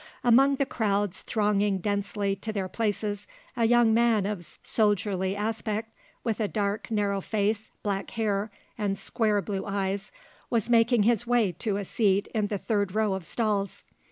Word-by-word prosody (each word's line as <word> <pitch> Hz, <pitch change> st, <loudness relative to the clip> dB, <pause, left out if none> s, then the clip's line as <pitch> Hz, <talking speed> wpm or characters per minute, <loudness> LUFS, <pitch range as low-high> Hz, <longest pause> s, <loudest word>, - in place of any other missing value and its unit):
'" -, -, -26 dB
Among 270 Hz, +4 st, +5 dB
the 275 Hz, -, +1 dB
crowds 205 Hz, -, 0 dB
thronging 210 Hz, -2 st, +1 dB
densely 200 Hz, +1 st, -1 dB
to 220 Hz, -, -4 dB
their 195 Hz, -3 st, -2 dB
places, 205 Hz, 0 st, -2 dB, 0.3 s
a 235 Hz, -2 st, +2 dB
young 240 Hz, -1 st, +5 dB
man 230 Hz, -3 st, +3 dB
of 200 Hz, -4 st, -3 dB, 0.2 s
soldierly 200 Hz, -3 st, +1 dB
aspect, 220 Hz, +1 st, -3 dB, 0.3 s
with 225 Hz, -2 st, -1 dB
a 215 Hz, -, +1 dB
dark, 205 Hz, 0 st, -2 dB
narrow 205 Hz, -3 st, 0 dB
face, 215 Hz, +1 st, -1 dB
black 200 Hz, -2 st, -2 dB
hair 210 Hz, -2 st, -1 dB, 0.3 s
and 200 Hz, -2 st, 0 dB
square 210 Hz, 0 st, 0 dB
blue 195 Hz, +1 st, -3 dB
eyes, 195 Hz, 0 st, -2 dB, 0.4 s
was 230 Hz, -1 st, 0 dB
making 230 Hz, -1 st, +4 dB
his 235 Hz, +1 st, +2 dB
way 235 Hz, -5 st, +3 dB
to 195 Hz, +4 st, -2 dB
a 205 Hz, -, -3 dB
seat 200 Hz, -1 st, +2 dB
in 215 Hz, -2 st, +1 dB
the 205 Hz, -, -2 dB
third 200 Hz, -2 st, -1 dB
row 215 Hz, -2 st, +2 dB
of 190 Hz, -3 st, -5 dB
stalls. 210 Hz, -4 st, -1 dB
210 Hz, 165 wpm, -27 LUFS, 200-225 Hz, 0.4 s, Among